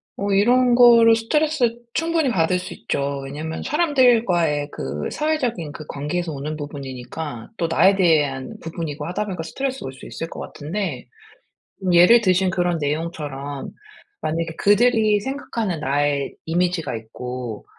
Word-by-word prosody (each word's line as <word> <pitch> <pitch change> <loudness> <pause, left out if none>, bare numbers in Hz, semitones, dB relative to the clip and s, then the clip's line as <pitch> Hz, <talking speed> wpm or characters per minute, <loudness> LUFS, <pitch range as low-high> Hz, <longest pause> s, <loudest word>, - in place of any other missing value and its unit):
어 200 0 -2
이런 245 +5 +4
거를 235 -2 +7
스트레스 255 +1 +1 0.2
충분히 325 -4 +1
받을 180 -3 +1
수 - - -7
있죠. 140 +3 -2
왜냐하면 155 +4 -5
사람들과의 230 - +2
그 70 +3 -4
사회적인 245 - -1
그 155 - -9
관계에서 160 +4 -3
오는 150 +2 -4
부분이니까 140 -2 -7
또 170 - 0
나에 190 +4 +4
대한 150 -8 +1
부분이고 160 -2 -5
하다 180 +5 -2
보니까 185 -5 -4
스트레스 265 +10 -4
올 130 - -5
수 135 - -13
있을 165 - -6
것 - - -9
같은데 155 -4 -5 0.8
예를 180 +7 +7
드신 185 -2 +2
그런 175 -2 0
내용처럼 145 -2 -4 0.5
만약에 165 +1 -2
그들이 215 0 +4
생각하는 225 - -3
나의 140 0 0
이미지가 170 -5 0
있고 120 0 -6
170 Hz, 325 characters per minute, -22 LUFS, 145-225 Hz, 0.8 s, 거를